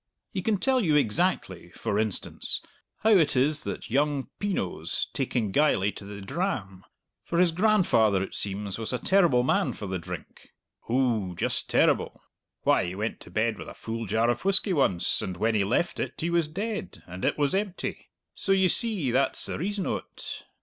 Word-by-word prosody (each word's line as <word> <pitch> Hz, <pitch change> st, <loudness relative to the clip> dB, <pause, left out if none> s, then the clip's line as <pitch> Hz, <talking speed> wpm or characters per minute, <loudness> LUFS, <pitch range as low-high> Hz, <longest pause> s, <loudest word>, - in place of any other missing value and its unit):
He 190 Hz, -, -3 dB
can 210 Hz, +2 st, +1 dB
tell 260 Hz, +4 st, +2 dB
you 155 Hz, -5 st, +2 dB
exactly, 150 Hz, -, 0 dB
for 105 Hz, -, -2 dB
instance, 110 Hz, -3 st, -1 dB, 0.4 s
how 220 Hz, -, +4 dB
it 160 Hz, -9 st, +4 dB
is 145 Hz, +4 st, +2 dB
that -, -, -5 dB
young 140 Hz, +1 st, +1 dB
Pin 205 Hz, -2 st, -1 dB
oe's 85 Hz, -2 st, -2 dB
taking 120 Hz, -6 st, -1 dB
geyly 105 Hz, -7 st, +3 dB
to 100 Hz, -, -9 dB
the 100 Hz, 0 st, -8 dB
dram; 100 Hz, -, -3 dB, 0.4 s
for 170 Hz, -, -3 dB
his 175 Hz, -1 st, +4 dB
grandfather, 165 Hz, -, +3 dB
it -, -, -7 dB
seems, 100 Hz, 0 st, 0 dB
was 110 Hz, -, -3 dB
a 125 Hz, -, 0 dB
terrible 170 Hz, -8 st, +3 dB
man -, -, +1 dB
for 105 Hz, -, -7 dB
the 95 Hz, -1 st, -3 dB
drink 85 Hz, -, -9 dB, 0.4 s
ou, 115 Hz, -7 st, +1 dB
just -, -, -1 dB
terrible. -, -, +2 dB, 0.4 s
Why, -, -, +3 dB
he 90 Hz, +1 st, -5 dB
went 105 Hz, +3 st, -3 dB
to -, -, -12 dB
bed 110 Hz, 0 st, 0 dB
with -, -, -8 dB
a -, -, -11 dB
full 115 Hz, 0 st, -5 dB
jar 110 Hz, +4 st, +2 dB
of 120 Hz, -, -4 dB
whisky 195 Hz, 0 st, +3 dB
once, 95 Hz, -, +2 dB
and 90 Hz, -1 st, -4 dB
when 115 Hz, +4 st, +1 dB
he 105 Hz, -2 st, +2 dB
left 120 Hz, -, 0 dB
it -, -, -4 dB
he 170 Hz, +2 st, -1 dB
was 170 Hz, -2 st, +2 dB
dead, 195 Hz, -, -5 dB
and 90 Hz, +1 st, -9 dB
it -, -, +1 dB
was 145 Hz, -2 st, +1 dB
empty. 195 Hz, -1 st, -3 dB, 0.2 s
So, 195 Hz, -, 0 dB
ye 190 Hz, -1 st, +4 dB
see, 200 Hz, -, +3 dB
that's 135 Hz, +3 st, +1 dB
the -, -, -3 dB
reason 200 Hz, +3 st, -2 dB
o't. -, -, -5 dB
130 Hz, 190 wpm, -27 LUFS, -, 0.4 s, how